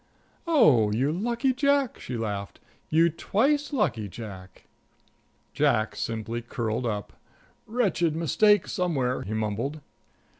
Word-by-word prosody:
"Oh, 150 - +5
you 130 +7 +1
lucky 235 - 0
Jack," 280 -1 +1
she 125 - -5
laughed. 100 -4 -4 0.3
"You 165 +2 +4
twice 280 - 0
lucky 150 - 0
Jack." 95 -2 -10 0.9
Jack 110 0 +1
simply 115 +1 -3
curled 120 0 -3
up: 105 -2 -4 0.5
"Wretched 190 -9 +1
mistake 205 +5 +3
somewhere," 145 -10 -1
he 110 +3 -4
mumbled. 110 +8 -2
140 Hz, 110 wpm, -26 LUFS, -, 0.9 s, Oh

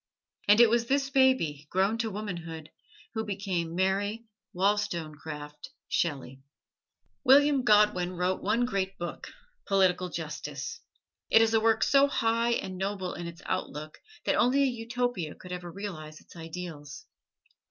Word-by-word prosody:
And 205 +2 +6
it 240 - +9
was 235 0 +2
this 275 +1 +1
baby, 260 - +2
grown 195 +5 +1
to 225 -1 0
womanhood, 170 -6 -6 0.4
who 220 -1 -2
became 190 -5 -3
Mary 200 +4 0 0.3
Wollstonecraft 160 -7 -2 0.2
Shelley. 135 -5 -2 0.8
William 280 0 +5
Godwin 210 -5 +4
wrote 180 +1 -1
one 225 +5 +1
great 195 -4 -2
book: 175 0 -6 0.4
"Political 185 -2 +2
Justice." 165 - -5 0.5
It 225 - +6
is 225 0 +1
a 225 - +5
work 225 0 +3
so 280 0 +5
high 230 -2 +1
and 185 -5 -3
noble 190 -1 -2
in 175 -1 -6
its 170 0 -10
outlook 155 -4 -4 0.3
that - - +2
only 270 +3 +3
a 265 -2 +1
Utopia 235 -7 -3
could 180 - -12
ever 180 -1 -6
realize 160 -6 -7
its - - -18
ideals. 165 -3 -8
195 Hz, 140 wpm, -29 LUFS, 170-230 Hz, 0.8 s, it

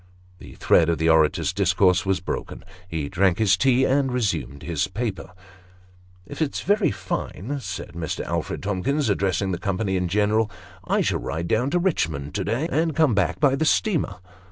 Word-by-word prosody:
The - - -12
thread 85 -1 +3
of 85 - +1
the 80 +2 +1
orator's 80 -1 +3
discourse 95 0 +2
was 95 -1 +1
broken. 90 - -5 0.2
He 80 -4 -3
drank 95 +2 +2
his 105 -4 +4
tea 130 +1 +3
and 135 -1 +1
resumed 105 - -2
the 85 +3 -2
paper. 105 -3 -4 0.5
" 90 0 -28
If 95 - -8
it's 150 -3 -1
very 205 0 +2
fine," 105 +6 -4
said - - -6
Mr. 85 -2 -4
Alfred 85 -2 -3
Tomkius, 110 +8 0
addressing 95 -1 0
the 90 - -3
company 100 -1 -1
in 90 -1 0
general, 105 +4 +1 0.2
" 95 +1 -22
I - - +3
shall - - 0
ride 85 +1 -4
down 120 +7 +1
to 175 - +1
Richmond 80 - -1
{o - - -1
day, 120 - -1
and 160 0 0
come 155 -6 +3
back 100 -3 0
by 145 -3 +4
the 155 - -1
steamer. 170 +2 +1
100 Hz, 185 wpm, -24 LUFS, 90-130 Hz, 0.5 s, his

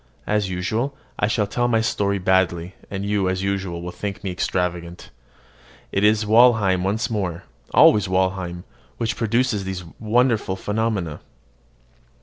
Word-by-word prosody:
As 105 -2 0
usual, 110 +10 -2 0.2
I 105 - +2
shall 105 0 +1
tell 120 +4 0
my 115 -2 +2
story 100 -2 0
badly; 90 -2 +1 0.2
and 100 0 -4
you, 100 -2 +1
as 95 0 -2
usual, 95 -3 -2
will 90 - -5
think 100 +4 -6
me 95 - -2
extravagant. 90 -1 -3 0.8
It 95 - 0
is 105 +1 +4
Walheim 110 -5 +4
once 110 +5 -1
more 95 -6 -2 0.3
always 105 -2 +6
Walheim 95 -2 -1 0.3
which 115 0 -1
produces 115 -2 0
these 95 -1 -5 0.2
wonderful 110 -3 +1
phenomena. 105 -6 -2
100 Hz, 135 wpm, -22 LUFS, 95-110 Hz, 0.8 s, always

